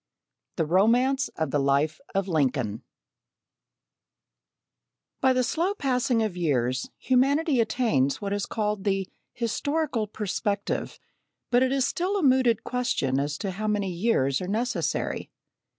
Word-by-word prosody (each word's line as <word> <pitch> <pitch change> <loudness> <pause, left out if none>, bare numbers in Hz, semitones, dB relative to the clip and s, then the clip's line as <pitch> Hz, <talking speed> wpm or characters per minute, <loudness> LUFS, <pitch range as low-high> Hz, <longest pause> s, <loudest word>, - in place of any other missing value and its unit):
The 165 - 0
Romance 240 - +3
of 160 -4 -1
the 145 - +1
Life 140 +3 +1 0.2
of 195 0 +1
Lincoln 130 - 0 2.4
By 260 - +4
the 255 0 +2
slow 345 +10 0
passing 250 - +1
of 210 -5 -2
years 130 -7 0
humanity 275 +2 +2
attains 160 - +1
what 200 -1 -3
is 205 0 -2
called 210 -2 -2
the 195 -2 0 0.2
"historical 250 0 -1
perspective," 205 0 -2 0.5
but 245 0 +4
it 260 0 +2
is 270 -2 +2
still 375 +4 -1
a 380 - -1
mooted 255 -4 +3
question 240 - 0
as 145 +1 -2
to 195 - -3
how 215 +4 -4
many 205 -3 0
years 170 - +1
are 180 - -4
necessary. 235 +5 -2
210 Hz, 135 wpm, -26 LUFS, 160-255 Hz, 2.4 s, By